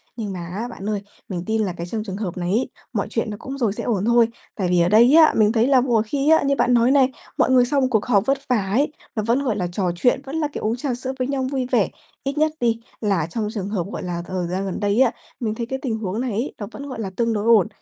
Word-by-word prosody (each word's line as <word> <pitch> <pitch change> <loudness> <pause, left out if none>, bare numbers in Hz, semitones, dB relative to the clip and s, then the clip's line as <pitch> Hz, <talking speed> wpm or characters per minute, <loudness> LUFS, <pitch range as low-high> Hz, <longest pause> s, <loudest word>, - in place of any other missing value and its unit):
Nhưng 215 -4 -4
mà 180 - -5
á, 205 +8 -4
bạn 210 -4 -6
ơi, 210 -2 -1 0.3
mình 175 -2 -3
tin 220 +1 0
là 185 -4 -1
cái 170 +1 -5
trong 215 +2 -3
trường 195 -2 -5
hợp 185 -5 -4
này 175 0 -2
ấy, 230 +6 +1 0.2
mọi - - -1
chuyện - - -1
nó 210 - -5
cũng 270 +2 -6
rồi 230 -7 +1
sẽ - - -5
ổn 210 -4 0
thôi. 235 -1 +5 0.3
Tại 190 -4 -1
vì 180 -1 +3
ở 170 - +3
đây 235 +6 +6
á, 320 -1 +7
mình 215 -1 +5
thấy 230 +2 +2
là 265 -3 +5
mọi 235 -4 +2
khi 280 +6 0
á, 320 - +5
như 280 0 +2
bạn 245 - +2
nói 240 +2 +4
này, 270 -2 +5 0.3
mọi - - +3
người 250 -1 +6
sau 275 +2 +1
một 260 - +3
cuộc 220 -3 +2
họp 210 -4 +3
vất 275 +2 +2
vả 210 -6 +1
ấy, 280 +8 +2 0.2
nó 215 - -1
vẫn, 240 +5 +1
gọi 230 -6 0
là, 180 -3 -1
trò 180 -1 0
chuyện, 245 +8 +2
vẫn 275 +3 -6
là, 315 -2 0
kiểu, - - -5
uống 220 +2 +1
trà 255 0 -2
sữa 255 +2 -4
với 255 - 0
nhau 270 -2 -1
vui 265 -2 -1
vẻ, 230 -6 +3 0.3
ít 275 +2 -3
nhất 310 0 +3
đi 230 -2 +1 0.2
là 195 -8 +1
trong 210 +5 -3
trường 200 -3 -3
hợp, 195 -5 -1
gọi - - -5
là, 175 -1 -3
thời 185 -2 -2
gian 185 +3 -2
gần 190 - -3
đây 205 +3 +1
á. 245 -3 +5 0.3
Mình 220 -3 -2
thấy 235 - -3
cái 265 +3 -4
tình 230 -5 -2
huống 210 +1 -3
này 255 -3 -2
ấy, 230 +7 -2
nó 205 - -5
vẫn, 280 +3 -8
gọi 250 -4 -6
là, 195 - -3
tương 230 +1 +1
đối 210 -1 -1
ổn, 225 -5 +5
225 Hz, 305 wpm, -22 LUFS, 200-255 Hz, 0.3 s, á